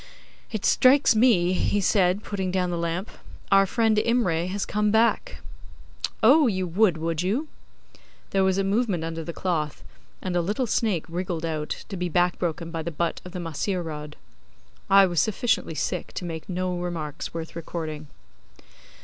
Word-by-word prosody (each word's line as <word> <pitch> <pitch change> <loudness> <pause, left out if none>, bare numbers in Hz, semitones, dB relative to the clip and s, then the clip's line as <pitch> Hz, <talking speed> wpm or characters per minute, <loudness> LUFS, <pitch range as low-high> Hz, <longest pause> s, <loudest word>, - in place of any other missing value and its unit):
'It 215 -3 -3
strikes 260 -1 +5
me,' 205 -4 +3
said 185 -2 +3
he, 205 - -11
putting 190 -2 -3
down 180 -1 0
the - - -1
lamp, 170 +4 -3 0.4
'our 195 0 +6
friend 225 +1 +2
Imray 215 -8 +1
has 195 +2 -2
come 210 0 0
back. 230 - +1 0.8
Oh! 280 +5 +7
you 185 -4 0
would, 180 0 +2
would 165 0 -2
you?' 225 - -1 0.8
There 195 -1 +2
was 190 0 +2
a 195 - +2
movement 200 -3 0
under 165 0 -4
the 170 - -5
cloth, 160 -4 -2 0.4
and 185 -1 -3
a 175 - +3
little 210 +9 -1
snake 210 -7 0
wriggled 170 -1 -3
out, 155 -2 -4
to 200 - -5
be 180 -1 -2
back 175 +1 +1
broken 170 -1 -3
by 165 -1 -3
the 165 - -3
butt 170 +1 -2
of 180 - -9
the 180 - -5
mahseer 175 +3 -2
rod. 150 -2 -7 0.7
I 195 0 +7
was 175 -4 +1
sufficiently 220 -6 0
sick 140 - -3
to 180 - -5
make 165 0 -6
no 180 0 -1
remarks 165 -4 -4
worth 165 -1 -6
recording. 160 -2 -5
180 Hz, 170 wpm, -25 LUFS, 165-205 Hz, 0.8 s, Oh